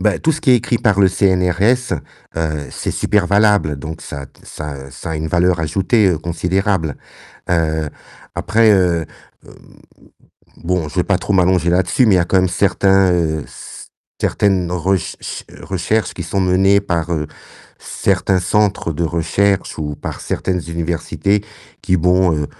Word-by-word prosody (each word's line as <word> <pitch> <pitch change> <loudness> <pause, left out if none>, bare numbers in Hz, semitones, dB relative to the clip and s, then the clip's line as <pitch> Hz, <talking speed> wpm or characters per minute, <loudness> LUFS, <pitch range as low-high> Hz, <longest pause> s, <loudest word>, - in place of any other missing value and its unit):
bah 105 +1 +1
tout 160 - +2
ce 155 -1 -2
qui 145 -5 +4
est 125 - +7
écrit 120 0 -1
par 100 -3 +2
le 95 - +6
CNRS, 95 +5 +2 0.4
heu, 75 -3 -2
c'est - - -4
super 105 -3 +1
valable, 100 -6 +3
donc 80 +3 -7
ça 70 -1 -7 0.2
ça 70 -3 -8
ça 70 - -7
a 80 - -2
une 80 +1 -3
valeur 90 +2 +2
ajoutée, 95 +7 +1
heu, 85 - 0
considérable. 90 0 -1 0.5
Heu, 80 -3 0 0.5
après, 110 0 +3
heu 90 -4 +2 0.4
hem, - - -14 1.1
bon, 90 -3 -1
je 75 - -11
vais - - +3
pas - - +1
trop - - -3
m'allonger 90 -2 +3
là-dessus, 90 +7 +2
mais 105 - +5
il - - +4
y - - +4
a - - +2
quand 90 - 0
même 95 0 +3
certains, 95 +1 +3
heu, 80 -3 0
c - - -11 0.3
certaines 95 -4 +1
rech 90 +1 -1
ch - - -7 0.2
recherches 95 +2 -1
qui 90 - -5
sont 90 +4 -2
menées 95 +2 +3
par, 85 -4 -2
heu, 75 -2 -1 0.5
certains 95 -1 0
centres 95 -1 0
de 80 - -3
recherche 90 +4 0
ou 75 -2 -4
par - - -6
certaines 90 -2 -2
universités, 85 +4 -1 0.4
qui 95 -2 +2
bon, 90 +1 +3
heu, - - -3
90 Hz, 165 wpm, -18 LUFS, 80-100 Hz, 1.1 s, est